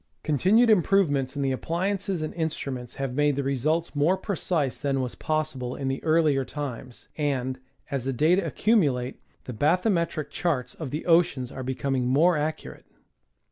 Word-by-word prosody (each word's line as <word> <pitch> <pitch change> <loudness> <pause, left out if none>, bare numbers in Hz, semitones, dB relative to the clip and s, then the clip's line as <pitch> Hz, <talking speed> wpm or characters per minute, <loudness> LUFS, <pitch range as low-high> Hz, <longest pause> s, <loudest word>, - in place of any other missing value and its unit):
Continued 195 - +4
improve, 195 -3 +4
ments 135 -1 -1
in 140 - -1
the 135 - +1
appliances 185 +5 -2
and 155 - -4
instruments 140 -7 -4
have 135 -2 -3
made 145 +1 +2
the 140 - -1
results 150 +5 0
more 155 +6 +3
precise 175 - -1
than 140 -2 0
was 125 -2 -2
possible 155 -5 -2
in 135 -1 -3
the 135 - -3
earlier 155 -4 +3
times, 130 -3 -7
and, 130 -3 -1 0.3
as 135 -3 -1
the 135 - 0
data 160 +9 +3
accumulate, 140 - +1 0.2
the 125 - -7
bathymetric 170 - +1
charts 145 -8 -1
of 155 -5 -6
the 150 +5 -4
oceans 165 -7 +2
are 130 - -6
be 130 +1 -3
comins: 135 -2 -1
more 160 +7 +4
accurate. 155 +1 -4
145 Hz, 165 wpm, -26 LUFS, 130-170 Hz, 0.3 s, Continued